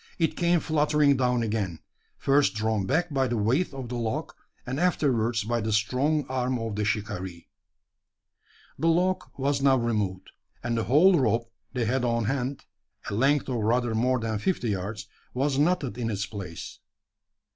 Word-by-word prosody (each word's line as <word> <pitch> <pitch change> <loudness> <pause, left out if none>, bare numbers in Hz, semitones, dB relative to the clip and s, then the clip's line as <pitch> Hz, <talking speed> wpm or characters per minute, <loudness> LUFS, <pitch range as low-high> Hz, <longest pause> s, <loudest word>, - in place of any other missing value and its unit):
It 165 -3 +1
came 175 0 +3
fluttering 150 -2 +3
down 125 -2 +1
again, 105 -6 -2 0.4
first 140 -3 +2
drawn 110 -3 0
back 160 +3 0
by 135 -1 +2
the 120 -1 -1
weight 125 - +1
of 135 -3 -6
the 125 - -3
log, 115 -2 -3 0.3
and 130 +3 -3
afterwards 120 -10 +1
by 115 +2 -1
the 110 +1 -2
strong 130 +8 +1
arm 130 -1 -1
of 115 -3 -4
the 105 - -1
shikaree. 95 -5 -3 1.3
The 165 - +1
log 180 +1 +2 0.2
was 140 +1 0
now 135 -1 +5
removed; 105 -6 -2 0.3
and 120 0 -1
the 115 - -1
whole 165 - +5
rope 115 -1 +1 0.2
they 125 -3 0
had 125 +3 0
on 115 -2 +1
hand 135 +2 -2 0.5
a - - -3
length 135 +6 +2
of 130 -3 -1
rather 115 +2 +1
more 125 +3 +2
than 110 -2 -2
fifty 125 - -1
yards 100 +1 -3 0.3
was 135 +1 +1
knotted 145 - +1
in 115 -2 -1
its 100 -2 -2
place. 100 -6 -8
125 Hz, 165 wpm, -27 LUFS, 110-140 Hz, 1.3 s, now